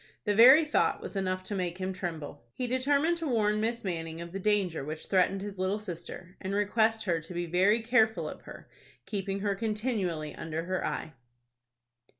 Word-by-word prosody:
The 205 - +1
very 260 +9 +8
thought 300 - +1
was - - -8
enough 185 -1 -1
to 205 - -6
make 180 -3 -2
him 190 0 -3
tremble. 165 -8 -6
He 250 - -2
determined 280 +7 +2
to 330 -2 -3
warn 215 -4 +1
Miss 230 +1 -1
Manning 165 -3 -4
of 170 0 -7
the 195 - -4
danger 195 -7 +1
which 155 +2 -6
threatened 190 0 +2
his 200 -1 -7
little 190 +2 0
sister, 175 -2 -8
and 190 +1 -3
request 220 +2 +2
her 170 -4 +1
to 165 +3 -10
be 175 0 -1
very 190 +6 +3
careful 225 -1 +2
of - - -8
her, - - -12 0.4
keeping 195 -1 -3
her 200 -1 +1
continually 210 - -2
under 160 +1 -4
her 185 +1 -2
eye. 155 - -3
195 Hz, 185 wpm, -29 LUFS, 175-220 Hz, 0.4 s, very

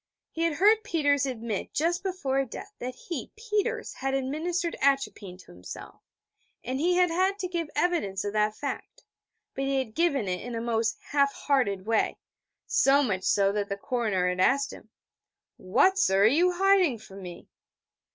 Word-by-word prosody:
He 330 - -5
had 335 - +1
heard 420 +7 +4
Peters 285 -7 +1
admit 230 -5 -4
just 345 +4 +1
before 290 -9 -1
death 270 - -9
that 250 +1 -5
he, 290 -3 -6
Peters, 445 +1 -2
had 270 +1 -2
administered 325 +6 -2
atropine 270 -9 0
to 185 - -16
himself: 90 +1 -10 0.6
and 260 +2 -3
he 350 +4 +2
had 360 -1 +3
had 375 +3 +1
to 380 -3 -3
give 340 -3 -3
evidence 295 - 0
of 205 - -3
that 215 0 +1
fact. 285 - -6 0.5
But 270 - -2
he 275 0 0
had 255 -5 -2
given 280 - +1
it 180 -1 -2
in 240 0 -6
a - - -2
most 230 -1 0
half 280 -1 +3
hearted 210 -10 0
way, 225 0 +1 0.5
so 280 +1 +4
much 190 -7 -1
so, 195 -1 +3
that 205 0 -2
the 200 - -3
coroner 210 -5 0
had 180 0 -1
asked 275 +8 +2
him: - - -13 0.7
'What, 375 - +3
sir, 190 +1 +3
are - - +7
you 335 +10 +4
hiding 375 -7 +3
from 195 -2 -12
me?' 175 -2 -9
270 Hz, 175 wpm, -27 LUFS, 215-345 Hz, 0.7 s, are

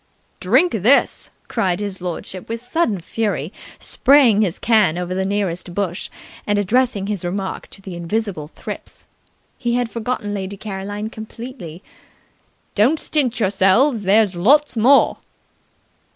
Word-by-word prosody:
"Drink 260 - +3
this!" 225 +7 +2 0.2
cried 180 -1 0
his 200 -3 -5
lordship 180 +2 -6
with 230 0 -3
sudden 245 - 0
fury, 195 -3 -2 0.2
spraying 255 -6 +4
his 190 -5 0
can 210 -8 +3
over 180 0 -3
the 190 +1 -1
nearest 190 -3 -2
bush, 190 -3 -2 0.4
and 205 0 +2
addressing 215 0 +1
his 205 -3 -3
remark 190 +2 -4
to 195 - -10
the 190 -3 -7
invisible 175 -2 -3
thrips. - - -8 0.5
He 240 -2 0
had 245 -2 -1
forgotten 230 -3 -3
Lady 195 0 -4
Caroline 205 +2 -5
completely. 220 - -9 0.9
"Don't 255 +10 +3
stint 260 -6 0
yourselves! 205 +5 +3
There's 200 0 +3
lots 275 +11 +4
more!" 250 +5 +4
205 Hz, 130 wpm, -20 LUFS, 185-235 Hz, 0.9 s, spraying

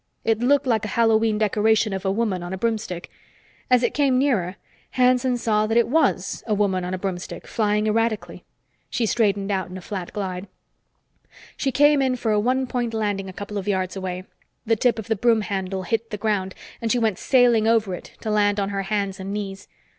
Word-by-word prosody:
It 225 -1 +1
looked 280 +4 +3
like 225 -5 +1
a - - -2
Hallowe'en 225 -1 +2
decoration 215 0 +2
of 190 0 -4
a 190 - +2
woman 200 -3 -1
on 175 +1 -5
a - - -3
broomstick. 210 -5 -3 0.6
As 250 -1 +4
it - - +1
came 275 -3 +2
nearer, 215 -10 +1 0.4
Hanson 250 0 +3
saw 215 -2 +1
that 225 +1 +1
it 235 - +4
was 315 +7 +1
a 215 - +1
woman 195 -3 +1
on 180 +1 -2
a - - -4
broomstick, 185 -1 -5
flying 210 -1 0
erratically. 220 0 -1 0.5
She 235 - 0
straightened 205 -3 +1
out 190 -2 -1
in 185 - -7
a - - -6
flat 185 -2 -6
glide. 190 -1 -4 1.1
She 270 - -1
came 290 +2 +4
in 260 -1 +1
for 235 -3 -1
a 210 - +3
one 255 +4 +1
point 240 -2 -2
landing 205 -3 -1
a - - -9
couple 205 +2 -5
of 195 - -7
yards 190 -2 -1
away. 185 -1 -4 0.4
The 225 0 +3
tip 240 +2 +2
of 220 - -5
the 225 - 0
broom 225 +1 +3
handle 190 -2 -3
hit 225 +4 -2
the 210 - -4
ground, 200 -3 -1 0.3
and 225 -1 0
she 250 - +3
went 220 -5 0
sailing 240 -4 +4
over 225 -4 +2
it, 180 - -8
to 220 - -2
land 205 -1 +2
on 200 0 -1
her 200 -1 -2
hands 195 -1 -2
and 190 +1 -5
knees. 200 -1 -5
215 Hz, 210 wpm, -23 LUFS, 195-230 Hz, 1.1 s, As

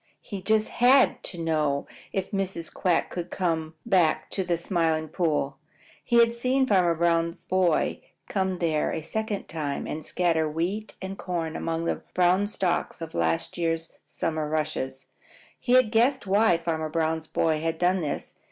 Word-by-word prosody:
He 200 -3 -7
just 215 +2 +2
HAD 255 +2 +4
to 180 - -6
know 155 -4 0 0.3
if 195 -1 -3
Mrs. 190 -4 -3
Quack 175 -3 0
would 175 -1 -4
come 160 -3 -1
back 185 -8 +2
to 190 - -1
the 175 -2 0
Smiling 165 -3 0
Pool. 150 -4 -1 0.5
He 235 - +2
had 230 0 +5
seen 255 +3 +1
Farmer 180 -7 +3
Brown's 170 +1 +1
boy 180 -4 +1 0.3
come 190 -2 -1
there 160 -3 0
a 160 - -3
second 220 +3 -3
time 150 -3 -3
and 155 +1 -5
scatter 165 -3 +1
wheat 185 +7 -3
and 190 +1 -6
corn 165 -3 -3
among 165 0 -2
the - - 0 0.2
brown 185 +3 +3
stalks 190 -4 -1
of 165 -1 -7
last 80 - -1 0.5
summer's 155 -2 -2
rushes, 150 -4 -2
and - - -32 0.3
he 245 - 0
had 255 -4 +5
guessed 245 +3 +3
why 200 -2 +4
Farmer 160 -2 -2
Brown's 160 0 -1
boy 155 -1 +1
had 165 0 -1
done 180 +2 +2
this. 150 - -4
170 Hz, 160 wpm, -26 LUFS, 160-195 Hz, 0.5 s, had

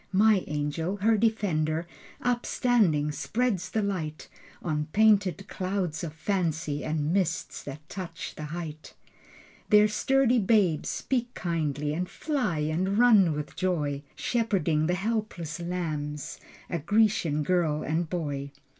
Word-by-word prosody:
My 205 0 +4
angel, 150 +5 -2
her 220 +3 +3
defender 175 -8 +1 0.4
Upstanding, 235 - +2
spreads 205 0 -1
the 220 +2 0
light 160 -6 -3 0.3
On 150 -2 -1
painted 200 -4 +3
clouds 185 -4 -2
of 160 -3 -4
fancy 160 -4 -1
And 155 0 -1
mists 180 -4 -1
that 150 +2 -8
touch 180 -2 -6
the 155 - -7
height. 155 -1 -7 0.7
Their 210 0 +7
sturdy 255 +3 +3
babes 195 -6 +2
speak 245 -2 -1
kindly 150 -4 -1
And 180 +3 -2
fly 260 - -1
and 175 +6 0
run 215 -8 +6
with 150 0 -5
joy, 150 -6 -1
Shepherding 185 -10 +1
the 180 - +1
helpless 190 -6 -3
lambs 155 -5 -4 0.3
A 170 - -2
Grecian 200 -4 +2
girl 160 -3 +1
and 160 +1 -1
boy. 145 -5 -3
175 Hz, 125 wpm, -28 LUFS, 155-210 Hz, 0.7 s, Their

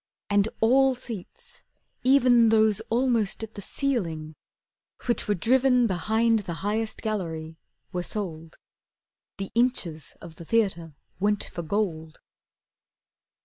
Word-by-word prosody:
And 205 +1 +3
all 265 +3 +4
seats, 230 -7 -9 0.4
even 250 -3 +5
Those 220 -2 +4
almost 230 -3 +1
at 220 0 -7
the 200 - -8
ceiling, 170 - -2 0.7
which 240 -1 +1
were 205 - +2
driven 250 +5 +3
Behind 220 +4 +2
the 180 -5 -5
highest 220 +1 -2
gallery, 165 -7 -4 0.3
were 180 - -2
sold. 165 -5 -5 0.8
The 195 -1 -5
inches 225 - 0
of 165 -2 -12
the 170 - -10
theatre 170 -8 0 0.2
went 205 +1 +1
for 170 - -6
gold. 160 -3 -3
210 Hz, 115 wpm, -26 LUFS, 170-235 Hz, 0.8 s, even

